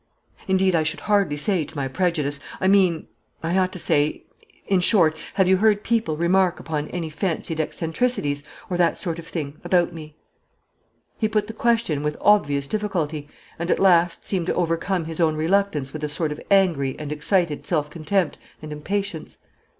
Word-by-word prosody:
Indeed 190 Hz, 0 st, +3 dB
I 165 Hz, -, +3 dB
should 155 Hz, 0 st, -1 dB
hardly 200 Hz, -8 st, +1 dB
say 175 Hz, +2 st, +1 dB
to 160 Hz, -, -10 dB
my 140 Hz, -2 st, -2 dB
prejudice; 150 Hz, -2 st, -1 dB, 0.2 s
I 190 Hz, -, +1 dB
mean 190 Hz, -4 st, +3 dB, 0.4 s
I 165 Hz, +2 st, 0 dB
ought 185 Hz, -1 st, +2 dB
to -, -, -4 dB
say 150 Hz, -3 st, 0 dB, 0.4 s
in 195 Hz, -2 st, +2 dB
short, 175 Hz, -4 st, +4 dB, 0.2 s
have 190 Hz, -2 st, +3 dB
you 190 Hz, 0 st, +5 dB
heard 210 Hz, 0 st, +3 dB
people 220 Hz, -10 st, 0 dB
remark 180 Hz, +2 st, +2 dB
upon 150 Hz, -2 st, -3 dB
any 165 Hz, -3 st, -5 dB
fancied 160 Hz, 0 st, -2 dB
eccentricities, 160 Hz, -, -1 dB, 0.3 s
or 180 Hz, -, -2 dB
that 175 Hz, -1 st, +2 dB
sort 170 Hz, -3 st, -3 dB
of 165 Hz, -, -10 dB
thing, 150 Hz, -3 st, -5 dB
about 175 Hz, -2 st, +2 dB
me?" 155 Hz, -2 st, -10 dB, 1.0 s
He 220 Hz, -, +1 dB
put 215 Hz, -1 st, +1 dB
the 220 Hz, -, -7 dB
question 225 Hz, -10 st, +1 dB
with 150 Hz, 0 st, -2 dB
obvious 145 Hz, -9 st, +3 dB
difficulty, 165 Hz, -7 st, -2 dB, 0.3 s
and 170 Hz, +1 st, -3 dB
at -, -, +3 dB
last 175 Hz, -3 st, +3 dB
seemed 180 Hz, -4 st, -1 dB
to -, -, 0 dB
overcome 170 Hz, +1 st, 0 dB
his 160 Hz, 0 st, -5 dB
own 160 Hz, -2 st, +3 dB
reluctance 160 Hz, -4 st, 0 dB
with 155 Hz, -1 st, -6 dB
a 150 Hz, -, -1 dB
sort 155 Hz, +1 st, -1 dB
of 150 Hz, -, -6 dB
angry 170 Hz, -9 st, +3 dB
and 150 Hz, -1 st, -6 dB
excited 155 Hz, +1 st, 0 dB
self 150 Hz, -4 st, 0 dB
contempt 170 Hz, +1 st, -1 dB, 0.2 s
and 155 Hz, -1 st, -9 dB
impatience. 180 Hz, +2 st, -4 dB
170 Hz, 180 wpm, -23 LUFS, 155-190 Hz, 1.0 s, you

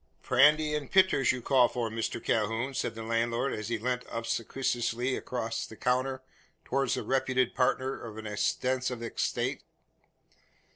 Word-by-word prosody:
"Prandy 150 Hz, +4 st, +4 dB
und 150 Hz, -1 st, -3 dB
pitters, 185 Hz, -8 st, +4 dB
you 125 Hz, -2 st, -5 dB
calls 130 Hz, -2 st, +4 dB
for, 120 Hz, -2 st, -1 dB
Mishter 115 Hz, +1 st, -2 dB
Calhoun?" 115 Hz, +4 st, 0 dB
said 115 Hz, -3 st, -2 dB
the 115 Hz, -, -6 dB
landlord, 115 Hz, +3 st, 0 dB
as 110 Hz, -1 st, -4 dB
he 115 Hz, -, 0 dB
leant 125 Hz, +2 st, -2 dB
obsequiously 120 Hz, +1 st, -1 dB
across 115 Hz, -2 st, -3 dB
the 110 Hz, -, -11 dB
counter 130 Hz, +2 st, 0 dB, 0.4 s
towards 135 Hz, -3 st, +1 dB
the -, -, -3 dB
reputed 130 Hz, -1 st, +1 dB
partner 130 Hz, +1 st, 0 dB
of 110 Hz, -2 st, -8 dB
an 110 Hz, -, -7 dB
extensive 125 Hz, +3 st, -1 dB
estate. 115 Hz, -, -2 dB
125 Hz, 145 wpm, -29 LUFS, 115-130 Hz, 0.4 s, Prandy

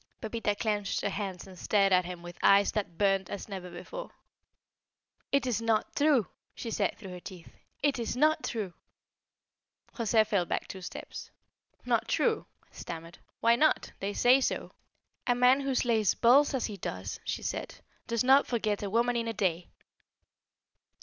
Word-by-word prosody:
Pepita 220 Hz, -2 st, -2 dB
clinched 205 Hz, -2 st, -1 dB
her -, -, 0 dB
hands 195 Hz, -3 st, -4 dB
and 185 Hz, -2 st, -13 dB
stared 195 Hz, -2 st, +3 dB
at 180 Hz, -1 st, +4 dB
him 175 Hz, -1 st, -7 dB
with 175 Hz, 0 st, -10 dB
eyes 200 Hz, 0 st, +5 dB
that 195 Hz, -6 st, -3 dB
burned 195 Hz, -2 st, +2 dB
as 200 Hz, -, -6 dB
never 190 Hz, -3 st, -6 dB
before. -, -, -8 dB, 1.2 s
"It 280 Hz, -1 st, +2 dB
is 235 Hz, -4 st, 0 dB
not 225 Hz, -1 st, 0 dB
true!" 285 Hz, -7 st, +3 dB, 0.3 s
she 230 Hz, -, -5 dB
said 200 Hz, -3 st, 0 dB
through 195 Hz, -4 st, -9 dB
her 180 Hz, -, -7 dB
teeth. 175 Hz, -2 st, -11 dB, 0.3 s
"It 285 Hz, -3 st, +2 dB
is 235 Hz, +1 st, -3 dB
not 310 Hz, +3 st, +3 dB
true!" 205 Hz, -6 st, -3 dB, 1.2 s
José 225 Hz, -2 st, +2 dB
fell 200 Hz, -4 st, +1 dB
back -, -, -2 dB
two 190 Hz, -, -8 dB
steps. -, -, -8 dB, 0.6 s
"Not -, -, +1 dB
true?" 450 Hz, -2 st, +1 dB, 0.2 s
he -, -, -18 dB
stammered. 165 Hz, 0 st, -8 dB, 0.2 s
"Why 230 Hz, +1 st, +5 dB
not? 310 Hz, +6 st, +2 dB
They 200 Hz, +1 st, -2 dB
say 250 Hz, +5 st, +5 dB
so." -, -, -2 dB, 0.6 s
"A 245 Hz, -, +3 dB
man 250 Hz, +2 st, +5 dB
who 275 Hz, -1 st, -1 dB
slays 225 Hz, -5 st, +2 dB
bulls 275 Hz, +4 st, +5 dB
as 255 Hz, -, 0 dB
he 210 Hz, -3 st, -5 dB
does," 95 Hz, -, -5 dB
she -, -, -4 dB
said, -, -, -4 dB, 0.3 s
"does 235 Hz, +1 st, 0 dB
not 270 Hz, +2 st, +5 dB
forget 215 Hz, -4 st, -1 dB
a 200 Hz, -, -3 dB
woman 235 Hz, +3 st, +2 dB
in 230 Hz, -1 st, -1 dB
a 225 Hz, -, -2 dB
day." 180 Hz, -4 st, -1 dB
215 Hz, 170 wpm, -30 LUFS, 190-245 Hz, 1.2 s, eyes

